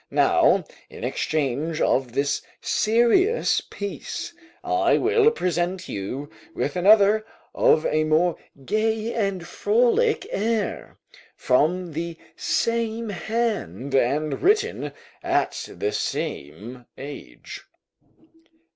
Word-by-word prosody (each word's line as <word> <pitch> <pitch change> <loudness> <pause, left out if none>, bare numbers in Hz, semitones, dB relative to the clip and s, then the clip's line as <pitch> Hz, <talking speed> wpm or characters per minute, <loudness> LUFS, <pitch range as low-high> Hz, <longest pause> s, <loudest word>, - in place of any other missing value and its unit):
Now, - - +3 0.3
in - - -10
exchange 155 +1 -1
of 130 -3 +1
this 140 +2 0 0.2
serious 240 - +2
piece, 200 +10 -6 0.3
I 355 -1 +2
will 435 +2 +4
present 180 - -2
you 125 +9 -5 0.3
with 145 - -2
another 205 +3 +5 0.3
of 480 -2 +3
a 155 0 +2
more 160 +3 +2 0.3
gay 220 - 0
and 195 -6 -1
frolic 245 - +2
air, 220 0 -2 0.4
from 165 +6 +1
the 165 +1 -4 0.2
same 230 -1 -1
hand, 190 - -2
and 140 +3 +1
written 390 - +1 0.3
at - - -1
the - - -2
same 110 - -5
age." 140 +2 -9
185 Hz, 95 wpm, -24 LUFS, 145-230 Hz, 0.4 s, another